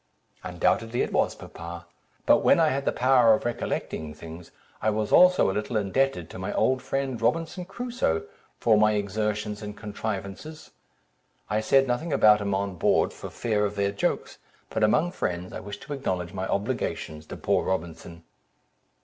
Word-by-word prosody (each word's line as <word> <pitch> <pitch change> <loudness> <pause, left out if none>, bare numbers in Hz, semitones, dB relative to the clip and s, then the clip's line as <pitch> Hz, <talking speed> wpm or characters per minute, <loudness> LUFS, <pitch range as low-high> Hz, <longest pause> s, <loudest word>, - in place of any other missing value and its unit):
"Undoubtedly 115 +1 0
it - - -4
was, - - +1
papa; 85 +1 -9 0.4
but - - +6
when - - +4
I 160 -2 +4
had 140 -1 -2
the - - +2
power 125 -3 +5
of - - -6
recollecting 80 -9 -3
things, 80 +1 -10 0.3
I 110 - +2
was 105 0 -1
also 180 - +6
a - - -3
little 105 +3 -2
indebted 105 -2 0
to - - -8
my 95 +2 -3
old 130 0 +2
friend, 135 -2 -2
Robinson 165 +8 0
Crusoe, 195 - -2 0.4
for 110 -2 +4
my 110 0 +4
exertions 105 +1 -2
and 105 -1 -7
contrivances. 105 +7 -6 0.8
I 105 - +2
said 135 +5 +4
nothing 130 +7 -1
about 105 -5 +5
him 100 -1 0
on 100 -2 -2
board, - - +2
for - - -8
fear 105 -3 -1
of 105 0 -1
their 100 0 +1
jokes, 100 - -2 0.3
but 110 - 0
among 155 +11 +3
friends, 90 - -3
I - - -5
wish 100 0 -7
to 140 +2 -6
acknowledge 90 -11 -3
my 95 0 -3
obligations 80 -5 -3
to - - -7
poor - - +1
Robinson." 85 -2 -4
105 Hz, 170 wpm, -26 LUFS, 95-130 Hz, 0.8 s, but